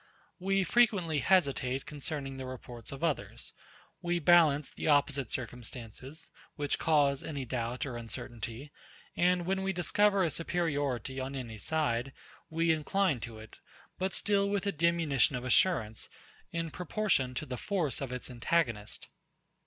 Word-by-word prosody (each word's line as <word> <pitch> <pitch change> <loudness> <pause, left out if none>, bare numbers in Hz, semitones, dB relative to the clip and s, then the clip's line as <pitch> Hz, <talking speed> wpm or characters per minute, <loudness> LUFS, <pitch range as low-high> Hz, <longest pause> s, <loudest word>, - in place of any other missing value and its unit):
We 195 +1 +2
frequently 185 -8 +3
hesitate 135 -7 +2
concerning 145 -2 -5
the 130 -1 -5
reports 125 -2 -8
of 140 +3 -7
others. 160 -4 -1 0.5
We 175 -1 0
balance 155 -4 +5
the - - -4
opposite 145 -4 +3
circumstances, 125 +3 -6 0.3
which 145 -1 -1
cause 145 -3 +3
any 140 -4 -4
doubt 120 +1 -2
or 125 -4 -4
uncertainty; 120 +3 -6 0.4
and 180 0 +3
when 190 +1 0
we 195 0 0
discover 195 +3 +3
a 165 - +1
superiority 145 -7 -1
on 135 +1 -4
any 115 -5 -6
side, 135 -4 0 0.4
we 165 +1 +2
incline 160 -1 +1
to 115 0 -7
it; 110 0 -12 0.4
but 190 0 0
still 200 -1 +2
with 200 -1 0
a 200 - +2
diminution 160 -6 +2
of 125 - -3
assurance, 125 -5 +2 0.4
in 165 -1 -2
proportion 180 -8 0
to - - -3
the 125 - -4
force 170 -3 -1
of 135 -2 -3
its 125 0 -4
antagonist. 120 -4 0
145 Hz, 145 wpm, -31 LUFS, 125-175 Hz, 0.5 s, balance